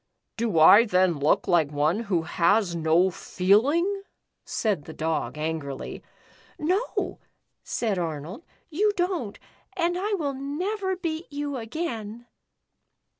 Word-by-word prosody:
" - - -55
Do 225 -6 0
I 200 +8 +8
then 180 -6 +2
look 145 +2 +2
like 165 -5 +3
one 150 +7 +1
who 195 -8 -1
has 175 +3 +2
no 165 +3 +3
feel 200 +8 +2
ing 370 +6 0 0.2
?" - - -54
said 200 -10 -1
the 160 - -8
Dog, 155 -5 -2
angrily. 150 -3 -4 0.6
"No," 370 +10 -1 0.4
said 215 -6 -1
Arnold, 165 - -5 0.3
"you 410 +6 +2
don't 350 - -1 0.4
and 345 0 +1
I 415 +3 -1
will 290 -7 -2
never 370 +9 -2
beat 330 -2 -4
you 290 0 -3
again." 235 -3 -5
220 Hz, 130 wpm, -26 LUFS, -, 0.6 s, I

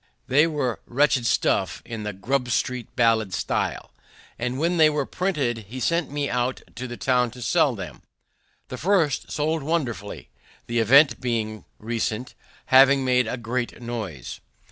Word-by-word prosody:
They 145 +5 +4
were 145 -7 -2
wretched 130 -1 +2
stuff, - - +1
in 115 -2 -6
the 105 0 -3
Grub 125 +6 -2
street 120 +2 -2
ballad 115 -6 +2
style; - - -2 0.5
and 125 +2 -2
when 170 +4 0
they 155 -1 +6
were 150 -2 -1
printed 135 - -2
he 130 +3 -6
sent 165 +4 0
me 145 0 -2
about 125 0 -1
the 120 0 -6
town 125 -2 +2
to 125 +2 -12
sell 120 +3 +2
them. 90 - -8 0.7
The 130 - -6
first 170 -5 +1
sold 155 +2 -1
wonderfully, 135 - -3 0.4
the 120 0 -1
event 135 +3 +5
being 110 -3 -2
recent, 115 +2 -3 0.4
having 135 0 +7
made 125 -2 +2
a 125 - -3
great 120 +1 -3
noise. 110 - -6
125 Hz, 150 wpm, -24 LUFS, 115-140 Hz, 0.7 s, having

